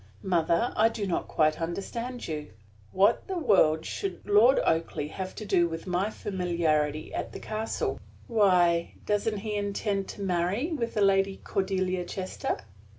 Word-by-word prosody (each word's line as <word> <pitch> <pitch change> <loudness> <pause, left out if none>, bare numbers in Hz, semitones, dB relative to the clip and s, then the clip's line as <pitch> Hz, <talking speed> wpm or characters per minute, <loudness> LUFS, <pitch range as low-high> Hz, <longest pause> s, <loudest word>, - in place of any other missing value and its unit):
"Mother, 170 +4 +1
I 220 +1 +5
do 220 -3 -3
not 180 - -1
quite 155 0 +1
understand 230 +9 -4
you. 150 -6 -5 0.4
What 200 +5 +3
the 380 - -3
world 185 - +3
should 395 -1 -5
Lord 215 +6 +6
Oakleigh 160 -2 0
have 190 -1 -5
to 215 - -6
do 175 -3 +3
with 165 0 -6
my 185 +3 0
familiarity 165 -7 -1
at - - -4
the - - -6
castle?" 220 +1 -3 0.3
"Why, 180 -6 +3
doesn't 210 +1 0
he 210 +1 -4
intend 200 -1 -1
to - - -8
marry 190 - 0
with 235 -7 -2
the 210 - +1
Lady 195 0 +3
Cordelia 185 -2 -1
Chester?" 185 +1 -3
195 Hz, 150 wpm, -28 LUFS, 170-215 Hz, 0.4 s, Lord